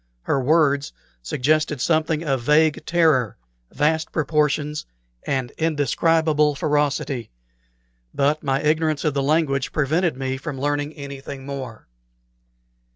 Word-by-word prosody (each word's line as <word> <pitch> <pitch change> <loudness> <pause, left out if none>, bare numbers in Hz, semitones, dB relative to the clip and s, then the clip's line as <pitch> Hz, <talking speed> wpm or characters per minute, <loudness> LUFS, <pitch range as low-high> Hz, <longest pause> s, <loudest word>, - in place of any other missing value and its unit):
Her 135 - 0
words 145 - +2 0.3
suggested 150 - 0
something 155 +2 +1
of 135 -5 0
vague 150 +4 +3
terror, 155 - +2 0.3
vast 160 +1 0
proportions, 150 -1 0 0.4
and 130 -3 -1
indescribable 155 0 +2
ferocity; 145 -4 -1 0.8
but 145 +2 +1
my 135 0 -1
ignorance 155 0 +1
of 155 - +1
the 140 - 0
language 140 -2 +1
prevented 155 +2 0
me 130 0 -2
from 140 -1 -6
learning 145 +1 -1
anything 140 -2 -8
more. 130 -5 -7
145 Hz, 110 wpm, -22 LUFS, 135-155 Hz, 0.8 s, vague